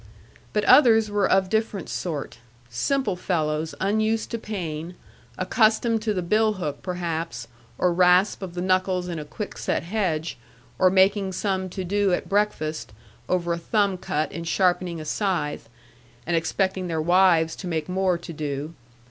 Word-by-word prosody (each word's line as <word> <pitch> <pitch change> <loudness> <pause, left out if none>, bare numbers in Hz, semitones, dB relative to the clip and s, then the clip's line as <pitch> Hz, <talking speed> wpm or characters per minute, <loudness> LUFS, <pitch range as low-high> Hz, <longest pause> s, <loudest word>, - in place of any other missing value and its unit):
But 210 - 0
others 225 -4 +6
were 205 -2 +1
of 190 0 +3
different 220 -1 -1
sort; 150 -8 -4 0.3
simple 210 - 0
fellows 160 -3 -1
unused 215 +3 0
to 230 - -2
pain, 175 -6 -5 0.4
accustomed 220 +3 +2
to 215 0 -1
the 180 - -1
bill 215 +4 +2
hook, 165 -8 -4
perhaps, 170 -7 -4 0.3
or 180 -1 +2
rasp 180 +3 +4
of 180 -2 -7
the 175 - -2
knuckles 185 -1 +1
in 170 -3 -4
a 150 - -6
quick 200 +8 -7
set - - -1
hedge, 170 - -2 0.4
or 185 - +6
making 190 +1 +3
some 190 -1 -1
to 190 +1 -5
do 200 +1 +1
at - - -1
breakfast, 160 - -1 0.4
over 175 -2 +1
a 170 - -3
thumb 200 +2 +1
cut 155 -3 -2
in 170 - -6
sharpening 175 0 +1
a 155 - -7
scythe, 155 - -2 0.6
and 170 - 0
expecting 185 +3 0
their 165 -2 -2
wives 170 -1 +4
to 185 - -6
make 160 -3 -2
more 185 -1 +1
to 170 0 -9
do. 150 +1 -4
185 Hz, 160 wpm, -24 LUFS, 165-200 Hz, 0.6 s, others